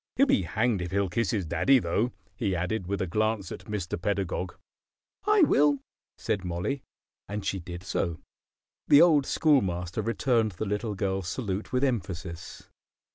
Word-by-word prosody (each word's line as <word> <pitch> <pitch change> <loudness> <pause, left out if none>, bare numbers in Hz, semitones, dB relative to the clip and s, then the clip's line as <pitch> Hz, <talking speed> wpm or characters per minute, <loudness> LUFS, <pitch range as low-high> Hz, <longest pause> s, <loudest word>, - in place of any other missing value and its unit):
He'll 275 - +5
be 275 -1 +3
hanged 110 -3 0
if 90 - -3
he'll 100 +1 0
kiss 115 +3 0
his 100 -5 0
daddy, 135 - +4
though!" 110 +3 0 0.2
he 100 -6 -1
added, 90 +2 -2
with 100 -1 -1
a - - -1
glance 110 +1 -1
at - - -8
Mr. 95 -5 -4
Pedagog. 95 -2 -2 0.7
"I 420 -3 +6
will," 145 - +4 0.4
said 100 -3 -2
Mollie; 90 +11 -2 0.5
and 105 -1 -4
she 95 0 -1
did 85 +1 -8
so. 85 -3 -2 0.7
The 145 - +8
old 150 -6 +4
Schoolmaster 95 - +1
returned 115 -1 +1
the 90 - -4
little 105 +1 -2
girl's 95 -2 -1
salute 100 +2 -3
with 125 +1 +1
emphasis. 90 -9 -3
100 Hz, 160 wpm, -28 LUFS, 90-120 Hz, 0.7 s, The